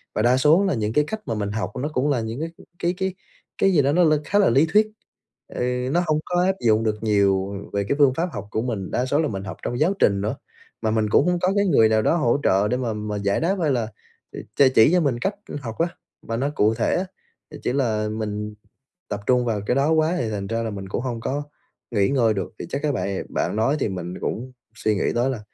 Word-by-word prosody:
Và - - +1
đa 120 +3 +4
số 155 +9 +4
là 190 - +1
những 110 -3 -1
cái 150 - +4
cách 220 +4 -4
mà 115 - -1
mình 100 -1 -2
học 105 -2 -3
nó 145 - -1
cũng 135 +2 +1
là 135 -5 +1
những 110 +3 -5
cái 165 - -3 0.3
cái 175 +1 0
cái 190 0 -1 0.4
cái 195 - +3
gì 155 - +5
đó 140 +1 +2
nó 175 +4 +4
l 155 -2 +5
khá 205 - +2
là 200 - +5
lý 135 +7 +4
thuyết. 215 +1 +5 0.7
Ừ, 125 +1 -1
nó 175 - +3
hông 155 -1 +2
có 175 0 +1
áp 190 0 +2
dụng 110 -1 +4
được 110 -1 -2
nhiều 100 -2 +2 0.2
về 100 0 0
cái - - +2
phương 140 -3 +5
pháp 170 +6 -1
học 100 -2 -6
của 110 - -1
mình, 110 -6 -3
đa 125 - 0
số 145 +3 +1
là 155 - 0
mình 100 -6 -4
học 95 -2 -7
trong 120 - -3
giáo 175 +6 +3
trình 100 -1 +3
nữa. 105 +6 -2 0.5
Mà 110 - 0
mình 110 -1 +1
cũng - - +4
hông 180 -1 +1
có 185 +1 +2
cái 200 0 +3
người 115 -10 +5
nào 110 0 +3
đó 135 - +2
hỗ 140 -3 +2
trợ 100 +2 +3
để 125 - 0
mà 120 -3 -2
-mà 105 0 -4
giải 100 0 0
đáp 185 +5 +1
hay 155 -3 +2
là 120 -4 0 0.7
ch - - 0
chỉ 110 +7 +7
cho 180 - +5
mình 135 -6 0
cách 195 +11 -1 0.3
học 115 -4 -6
á, 165 - +3 0.4
mà 115 - -2
nó 135 +4 0
cụ 105 +2 +3
thể 115 - 0
á. 185 - 0 0.5
Thì 150 - -9
chỉ 125 - 0
là 110 -6 0
mình 105 -1 -4 0.6
tập 100 - -3
trung 125 -1 +3
vào 110 -4 -1
cái 125 - +2
đó 140 +3 +2
quá 160 +2 +2
thì 115 - -1
thành 100 -2 -4
ra 115 +2 -1
là 115 - -2
mình 95 -1 -7
cũng 105 - -2
hông 120 -2 -3
có 140 +5 -2 0.5
nghỉ 100 -4 +2
ngơi 120 -5 +3
được. 100 +2 -4
Thì - - -5
chắc 140 - -3
á 150 - +2
bà 125 - -2 0.2
bạn - - -1
nói 115 +7 +2
thì 110 - 0
mình 90 -2 -5
cũng 125 +3 -3 0.2
suy 110 -1 0
nghĩ 100 - -1
tới 120 +3 +2
là, 130 -4 -3
120 Hz, 270 wpm, -23 LUFS, 105-150 Hz, 0.7 s, chỉ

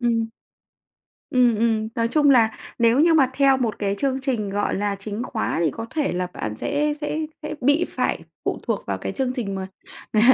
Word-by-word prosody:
Ừm. 230 -2 +1 1.0
Ừm, 245 -3 +4
ừm. 220 -1 +1
Nói 230 -1 +1
chung 290 +1 +4
là 225 -4 +4 0.2
nếu 235 +3 +4
như 330 +1 +5
mà 270 -4 +4
theo 275 -1 +4
một 230 -4 -1
cái 200 -1 0
chương 270 -1 0
trình, 235 -7 -1
gọi 205 +1 0
là, 205 0 -1
chính 210 +3 -4
khóa 225 -9 -2
thì 155 - +3
có 225 - -6
thể 295 - 0
là 180 0 -1
bạn 105 0 -4
sẽ 295 - 0
sẽ 300 +1 -2 0.2
sẽ 305 - -4
bị 290 +7 +3
phải - - -1 0.2
phụ - - -1
thuộc - - -2
vào - - -2
cái - - -4
chương 260 -2 -1
trình 210 -6 -3
mà 190 0 -4 0.5
ng 215 - +4
235 Hz, 210 wpm, -23 LUFS, 215-275 Hz, 1.0 s, như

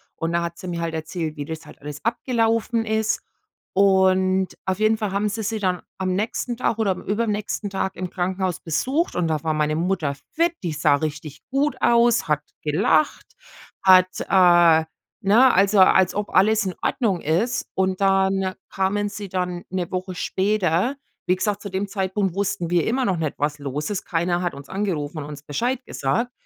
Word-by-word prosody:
und 165 0 -2
da 170 0 +1
hat 170 0 -5
sie 185 - -8
mir 170 -1 -3
halt 165 -1 -2
erzählt, 160 0 -4
wie 145 - -4
das 160 +1 -7
halt - - -15
alles 145 0 -8
abgelaufen 230 -1 0
ist. 220 0 0 0.5
Und 190 -1 +3 0.2
auf 190 0 -1
jeden 215 +1 +3
Fall 210 -2 -2
haben 200 +2 0
sie 220 +2 -4
sie 220 +1 -2
dann 185 -3 0 0.2
am 185 -1 -1
nächsten 225 +4 -2
Tag 225 - 0
oder 220 -3 +1
am 185 - -4
übernächsten 210 0 -2
Tag 190 0 -2
im 185 -1 -4
Krankenhaus 185 0 -2
besucht 265 - -1
und 175 -2 0
da 155 -2 -1
war 160 - +1
meine 155 0 0
Mutter 170 -5 -1 0.2
fit, 335 +1 +2
die 170 -3 -2
sah 150 -1 +3
richtig 150 0 -5
gut 275 0 0
aus, 235 0 +4
hat 150 -1 +1 0.2
gelacht, 160 - +1 0.6
hat, 185 -1 +6 0.2
äh 175 -4 +6 0.4
ne? 230 +7 +5
Also, 195 +2 +4
als 185 -1 +5
ob 205 0 -2
alles 210 +2 +4
in 185 - -3
Ordnung 205 -9 0
ist. 185 +11 0
Und 190 0 0
dann 195 -1 +2 0.2
kamen 195 +2 0
sie 205 -1 -7
dann 180 -1 -3
'ne 185 -2 -2
Woche 185 0 -4
später. 195 - 0 0.3
Wie 180 - +3
gesagt, 205 +1 -1
zu 200 - -6
dem 190 +1 -2
Zeitpunkt 195 -2 -1
wussten 200 -3 -1
wir 175 -2 +2
immer 255 +3 +1
noch 190 - +1
nicht, 155 -3 -2
was 150 0 -1
los 145 +3 -4
ist. 205 -2 -3
Keiner 175 +1 0
hat 175 -1 -1
uns 140 0 -11
angerufen 170 -6 -2
und 145 - -5
uns 145 -1 -9
Bescheid 235 - -1
gesagt. 230 - -1
190 Hz, 190 wpm, -23 LUFS, 170-210 Hz, 0.6 s, hat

